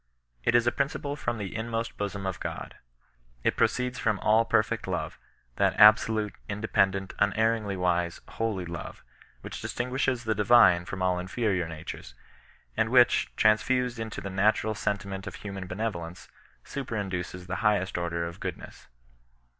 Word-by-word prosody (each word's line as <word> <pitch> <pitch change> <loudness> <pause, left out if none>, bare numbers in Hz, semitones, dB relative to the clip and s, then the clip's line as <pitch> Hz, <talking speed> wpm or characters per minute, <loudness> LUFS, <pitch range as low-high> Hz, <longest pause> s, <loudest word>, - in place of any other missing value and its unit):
It 120 - +2
is 120 0 +5
a 120 - +3
principle 140 +2 -2
from 120 -5 -3
the 100 -1 -5
inmost 115 0 -3
hosom 100 -1 -3
of 95 - -3
€^. - - -5 0.7
It - - +2
pro - - +5
ceeds 125 0 -3
from 110 -3 +1
ALL 110 +2 +4
PEBFECT 110 -1 +1
LOTE, - - -2 0.4
that - - +2
ahsolutc, 105 0 +6 0.2
independ 100 -2 +1
ent, 95 0 -5
imerringlj 105 0 +1
wise, 90 -1 0
holy 110 -5 -2
hve, 85 0 -7 0.4
which - - -7
distinguishes 125 0 -1
the 110 -1 +1
Divine 105 -5 +5
from 95 +1 -4
all 90 -1 +1
inferior 95 -1 -1
natures, 80 -6 -8 0.6
and 115 - +1
which, 120 -1 +4
transfused 120 +3 +2
into 110 -2 -5
the 100 - -5
natural 105 +3 +2
sentiment 100 -2 -3
of - - -6
human 100 -2 -7
henevolence, 90 -4 -5 0.3
super 135 -5 -5
induces 90 -3 -4
the 95 +2 -3
highest 105 -5 +1
order 85 -1 -1
of 85 0 -7
goodness. - - -7
105 Hz, 155 wpm, -28 LUFS, 95-115 Hz, 0.7 s, ahsolutc